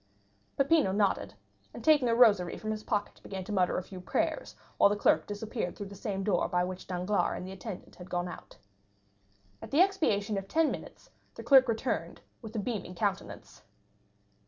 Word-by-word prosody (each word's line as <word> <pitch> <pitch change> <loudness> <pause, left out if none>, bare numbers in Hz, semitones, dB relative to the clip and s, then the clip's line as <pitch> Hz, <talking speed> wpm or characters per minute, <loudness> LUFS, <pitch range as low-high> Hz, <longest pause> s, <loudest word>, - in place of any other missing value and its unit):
Peppino 280 -5 +3
nodded, 200 0 0 0.4
and - - -8
taking 295 -6 +5
a 230 - +3
rosary 210 -7 +4
from 215 - -4
his 215 0 -4
pocket 210 -3 -2
began 190 -1 -6
to 200 - -8
mutter 185 -3 +2
a 185 - -2
few 185 -1 -10
prayers - - -2 0.2
while - - +6
the 205 - +1
clerk 205 - +2
disappeared 210 -2 -4
through 205 - -6
the 200 - -10
same 195 -1 -3
door 190 -3 +1
by 180 0 +1
which 185 0 -6
Danglars 185 +3 0
and - - -6
the 190 - -7
attendant 190 0 -8
had 180 0 -11
gone 175 0 -1
out. - - -10 1.0
At - - -8
the 300 - +4
expiration 220 - +2
of 195 - -10
ten 320 +7 +2
minutes - - -9 0.2
the - - -8
clerk 265 -2 +7
returned 230 +2 -2 0.2
with 220 -1 -9
a - - -1
beaming 205 -4 -4
countenance. 200 0 -3
205 Hz, 185 wpm, -30 LUFS, 185-230 Hz, 1.0 s, clerk